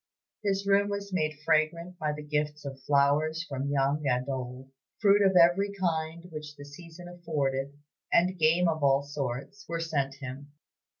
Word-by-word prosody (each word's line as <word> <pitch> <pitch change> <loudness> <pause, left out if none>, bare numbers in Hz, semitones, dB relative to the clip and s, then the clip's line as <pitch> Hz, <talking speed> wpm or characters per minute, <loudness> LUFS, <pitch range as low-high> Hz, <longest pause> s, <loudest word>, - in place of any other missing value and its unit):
His 200 -1 0
room 200 +1 +3
was 200 -1 -4
made 155 -4 0
fragrant 170 +3 +1
by 155 -1 0
the 150 0 -6
gifts 150 0 -2
of 135 -1 -7
flowers 145 +4 +2
from 135 0 -3
young 140 +1 +1
and 125 0 +1
old. 130 0 -5 0.3
Fruit 205 -1 +5
of 190 -1 +4
every 180 +4 +5
kind 165 -2 -1
which 150 -1 -8
the 145 -1 -11
season 165 +4 -12
afforded, 145 -5 -2 0.3
and 180 +1 +3
game 165 +3 +4
of 160 -2 -1
all 135 0 +4
sorts, 140 +6 -5
were 165 0 -2
sent 140 -4 -1
him. 140 +1 -9
155 Hz, 165 wpm, -29 LUFS, 140-175 Hz, 0.3 s, Fruit